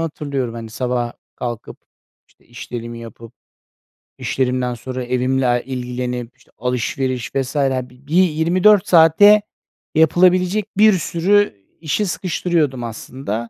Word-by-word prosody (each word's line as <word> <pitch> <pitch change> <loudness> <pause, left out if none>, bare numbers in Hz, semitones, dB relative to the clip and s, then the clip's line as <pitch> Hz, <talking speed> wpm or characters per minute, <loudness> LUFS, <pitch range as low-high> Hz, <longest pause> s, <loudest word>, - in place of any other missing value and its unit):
hatırlıyorum. 140 -6 -3
Hani, 115 -1 -8
sabah 120 0 -2 0.2
kalkıp, 120 -3 -6 0.5
işte, - - -30
işlerimi 115 0 -7
yapıp, 115 0 -11 0.9
işlerimden 125 -1 -1
sonra 130 +2 -6
evimle 125 0 0
ilgilenip, 125 -1 -5
işte, - - -26
alışveriş 125 +1 -2
vs. 135 +2 -2
hani, 130 -3 0 0.2
bir 155 - -3
24 185 +5 +3
saate 180 +6 +6 0.5
yapılabilecek 180 +5 +3
bir 215 0 +6
sürü 190 - +1 0.3
işi 170 +6 -1
sıkıştırıyordum 165 -8 -1
aslında. 115 0 -5
130 Hz, 105 wpm, -19 LUFS, 120-165 Hz, 0.9 s, saate